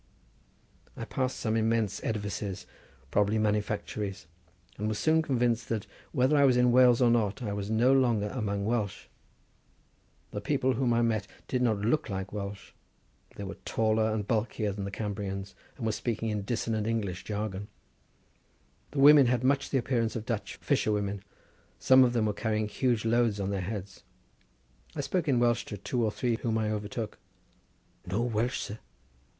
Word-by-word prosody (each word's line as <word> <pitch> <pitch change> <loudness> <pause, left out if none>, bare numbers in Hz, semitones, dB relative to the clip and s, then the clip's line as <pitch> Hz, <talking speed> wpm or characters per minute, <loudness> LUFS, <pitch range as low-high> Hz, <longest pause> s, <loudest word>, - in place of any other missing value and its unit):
I - - -4
passed 130 -1 -2
some 110 -1 0
immense 110 -2 0
edifices, 105 -3 -3 0.5
probably 105 +4 +2
manufactories, 105 -2 -2 0.5
and 105 - -1
was 110 -1 -1
soon 155 +8 +3
convinced 120 -5 0
that, 110 -3 -2 0.3
whether 130 +1 +3
I 140 - +5
was 130 -3 +5
in 125 0 +4
Wales 125 0 +6
or 120 - +5
not, 115 +1 +1
I 105 -3 -2
was 100 0 -4
no 120 +4 +4
longer 120 -6 +2
amongst 100 -4 -2
Welsh. 105 -4 -1 1.3
The 105 - -4
people 130 +3 +1
whom 125 0 +1
I 120 0 +3
met 110 -3 0 0.2
did 125 - -1
not 110 -5 +1
look 120 +6 +1
like 95 0 -4
Welsh. 100 -1 -6 0.6
They 100 - -6
were 95 0 -7
taller 110 0 +1
and 105 -2 -2
bulkier 110 -2 0
than 100 0 -5
the - - -3
Cambrians, 100 -2 -4 0.2
and 120 - -4
were 110 - +2
speaking 110 +1 -2
a 105 -1 -1
dissonant 110 0 -2
English 100 -6 -2
jargon. 105 -1 -4 1.2
The 145 - -4
women 140 -1 +8
had 125 0 +1
much 140 +2 +2
the 135 - +1
appearance 120 -3 0
of 110 -1 -4
Dutch 115 -3 -3
fisherwomen; 100 -2 0 0.6
some 130 0 +6
of 120 -1 +2
them 115 -3 +2
were 105 - 0
carrying 110 0 -1
huge 120 0 0
loads 115 -2 +2
on 100 0 -1
their 100 -1 -1
heads. 100 0 -6 0.9
I - - -1
spoke 180 -4 -1
in 135 -4 +3
Welsh 120 -1 +2
to 105 - -6
two 120 +5 -2
or 110 - +1
three 120 0 -1
whom 115 -2 -1
I 110 -1 0
overtook. 105 +1 -4 0.9
"No 100 +6 0
Welsh, 120 +2 0
sir!" 105 +2 -6
110 Hz, 170 wpm, -29 LUFS, 105-120 Hz, 1.3 s, women